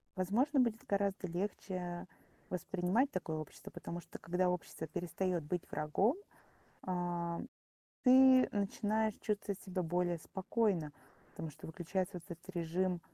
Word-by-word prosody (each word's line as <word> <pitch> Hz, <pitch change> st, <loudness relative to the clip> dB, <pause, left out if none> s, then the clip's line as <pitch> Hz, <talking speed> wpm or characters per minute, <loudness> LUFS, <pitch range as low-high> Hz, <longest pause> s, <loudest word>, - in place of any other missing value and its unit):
возможно, 235 Hz, +10 st, +2 dB
будет 230 Hz, -2 st, 0 dB
гораздо 200 Hz, -1 st, 0 dB
легче 180 Hz, -1 st, -3 dB, 0.4 s
воспринимать 185 Hz, -, +1 dB
такое 160 Hz, -3 st, -2 dB
общество, 155 Hz, -2 st, -8 dB
потому 170 Hz, -, -5 dB
что -, -, -10 dB
когда 180 Hz, +2 st, +1 dB
общество 165 Hz, -2 st, -3 dB
перестаёт 175 Hz, +1 st, -1 dB
быть 175 Hz, +4 st, -3 dB
врагом, 185 Hz, -, +2 dB, 0.7 s
а, 175 Hz, -2 st, -1 dB, 0.6 s
ты 260 Hz, 0 st, +8 dB
начинаешь 215 Hz, +1 st, +1 dB
чувствовать 205 Hz, -2 st, -1 dB
себя 185 Hz, -1 st, -2 dB
более 175 Hz, 0 st, +1 dB
спокойно, 185 Hz, -3 st, 0 dB, 0.4 s
потому 160 Hz, -, -5 dB
что 145 Hz, -, -11 dB
выключается 180 Hz, +3 st, -2 dB
вот 170 Hz, -, -15 dB
этот 170 Hz, +2 st, -9 dB
режим, 175 Hz, +1 st, 0 dB
180 Hz, 125 wpm, -36 LUFS, 170-205 Hz, 0.7 s, ты